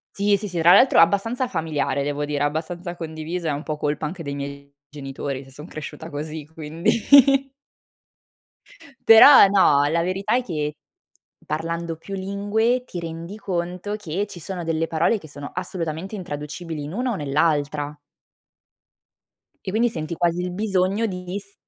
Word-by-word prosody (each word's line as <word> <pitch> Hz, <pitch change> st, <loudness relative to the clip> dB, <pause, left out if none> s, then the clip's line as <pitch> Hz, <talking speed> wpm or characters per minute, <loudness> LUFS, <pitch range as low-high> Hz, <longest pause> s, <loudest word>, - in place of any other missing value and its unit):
Sì, 200 Hz, 0 st, +3 dB
sì, 205 Hz, +1 st, -5 dB
sì, 175 Hz, -2 st, -4 dB
tra 170 Hz, +2 st, +6 dB
l'altro 250 Hz, +7 st, +6 dB
è -, -, +9 dB
abbastanza 225 Hz, +9 st, +1 dB
familiare 160 Hz, -, -1 dB
devo 145 Hz, +1 st, -2 dB
dire, 145 Hz, -1 st, -2 dB
abbastanza 170 Hz, +4 st, -3 dB
condiviso, 165 Hz, +1 st, -5 dB
è 155 Hz, -, +1 dB
un 145 Hz, +1 st, -4 dB
po' 155 Hz, -2 st, -4 dB
colpa 150 Hz, 0 st, -2 dB
anche 165 Hz, +1 st, -6 dB
dei 140 Hz, 0 st, -4 dB
miei 140 Hz, 0 st, -7 dB
genitori 135 Hz, -1 st, -6 dB
se 135 Hz, -, -16 dB
son 150 Hz, +5 st, -10 dB
cresciuta 155 Hz, +2 st, -8 dB
così, 155 Hz, +1 st, -6 dB
quindi. 160 Hz, +1 st, -1 dB, 2.2 s
Però 225 Hz, +1 st, +10 dB
no, 150 Hz, -8 st, +4 dB
la 165 Hz, +3 st, +1 dB
verità 195 Hz, +6 st, 0 dB
è 255 Hz, -, +1 dB
che, 150 Hz, -7 st, -3 dB, 0.7 s
parlando 165 Hz, +1 st, -3 dB
più 195 Hz, +5 st, -8 dB
lingue 205 Hz, +6 st, 0 dB
ti 180 Hz, -, -6 dB
rendi 170 Hz, +4 st, -7 dB
conto 180 Hz, +1 st, -3 dB
che 195 Hz, 0 st, -3 dB
ci 200 Hz, -3 st, -10 dB
sono 180 Hz, +1 st, -5 dB
delle 165 Hz, 0 st, 0 dB
parole 165 Hz, +7 st, +1 dB
che 155 Hz, -, -13 dB
sono 145 Hz, 0 st, -8 dB
assolutamente 180 Hz, +1 st, -4 dB
intraducibili 150 Hz, -2 st, -6 dB
in 150 Hz, -, -7 dB
una 245 Hz, +3 st, -1 dB
o -, -, -2 dB
nell'altra 145 Hz, 0 st, 0 dB, 1.7 s
e 190 Hz, -, -2 dB
quindi 230 Hz, +4 st, +2 dB
senti 160 Hz, -3 st, -4 dB
quasi 170 Hz, +1 st, 0 dB
il 180 Hz, 0 st, -3 dB
bisogno 195 Hz, +2 st, 0 dB
di 180 Hz, 0 st, -5 dB
s 200 Hz, 0 st, -13 dB
170 Hz, 160 wpm, -23 LUFS, 150-195 Hz, 2.2 s, Però